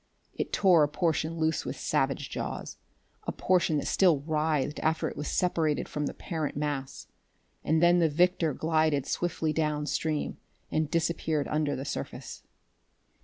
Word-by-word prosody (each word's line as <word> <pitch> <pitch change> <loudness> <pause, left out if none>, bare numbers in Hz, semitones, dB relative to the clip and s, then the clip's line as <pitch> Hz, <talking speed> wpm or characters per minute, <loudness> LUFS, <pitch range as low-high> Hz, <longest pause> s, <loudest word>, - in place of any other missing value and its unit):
It - - -3
tore 180 -5 +5
a 150 - +5
portion 165 +1 -1
loose 160 -1 +1
with - - -4
savage - - 0
jaws, - - -5 0.5
a - - +1
portion 175 -4 +2
that - - -2
still 170 -7 +3
writhed 150 -1 0
after 160 +1 +1
it - - -6
was 150 - -4
separated 165 -4 +1
from 150 -1 -2
the - - -4
parent 160 -5 -3
mass; 145 -2 -3 0.6
and 160 +2 +2
then 175 +1 +6
the 165 -2 +4
victor 175 +1 +2
glided 155 -3 +1
swiftly 160 -3 -1
downstream, 150 0 -1 0.3
and 155 -1 0
disappeared 160 -2 0
under 150 -2 0
the 135 - -5
surface.... 140 - -6
155 Hz, 150 wpm, -29 LUFS, 150-165 Hz, 0.6 s, then